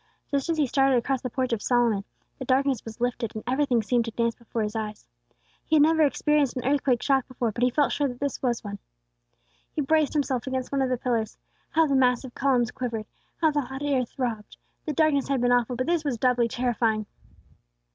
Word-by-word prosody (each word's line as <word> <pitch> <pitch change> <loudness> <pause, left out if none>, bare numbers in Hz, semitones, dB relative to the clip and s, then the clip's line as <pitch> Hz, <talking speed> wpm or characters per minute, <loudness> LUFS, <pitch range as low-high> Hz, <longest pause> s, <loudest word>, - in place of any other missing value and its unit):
Just 280 +2 -1
as 330 - +1
he 300 - +3
started 270 0 +3
across 260 +2 -1
the 255 - -3
Porch 255 0 -1
of 220 - -2
Solomon, 235 -5 +2 0.4
the 260 - -5
darkness 265 -1 +1
was 225 0 -9
lifted, 245 -2 -2
and 215 - -5
everything 255 -3 +1
seemed 235 +2 +1
to - - -3
dance 230 +1 0
before 230 -1 -4
his 210 +1 -4
eyes. 215 -1 -5 0.6
He 315 - +1
had 295 - +6
never 320 +1 +3
experienced 295 -2 +2
an 250 - -4
earthquake 270 -3 +1
shock 270 -2 +2
before, 240 -3 -2
but 235 - -6
he 250 - +4
felt 285 +3 +1
sure 290 -1 +1
that 245 -2 -7
this 280 -1 -3
was 240 -3 -1
one. 205 -1 -6 0.9
He 305 - -2
braced 310 +1 +2
himself 270 -4 -1
against 260 -1 -3
one 275 -1 +1
of 260 - +1
the 255 - 0
pillars. 230 -3 -2 0.3
How 325 +1 +3
the 280 - 0
massive 250 -1 +2
columns 250 -3 +1
quivered! 230 -4 -4 0.4
How 320 -2 +4
the 295 0 +1
hot 265 +2 -7
air 275 -3 +1
throbbed! 235 -3 -5 0.3
The 305 - -1
darkness 295 -2 +2
had 275 -2 0
been 245 0 +2
awful, 245 0 +2
but 255 +2 -1
this 335 -1 +1
was 275 -5 -1
doubly 245 0 +2
terrifying. 230 -3 0
255 Hz, 215 wpm, -26 LUFS, 235-280 Hz, 0.9 s, had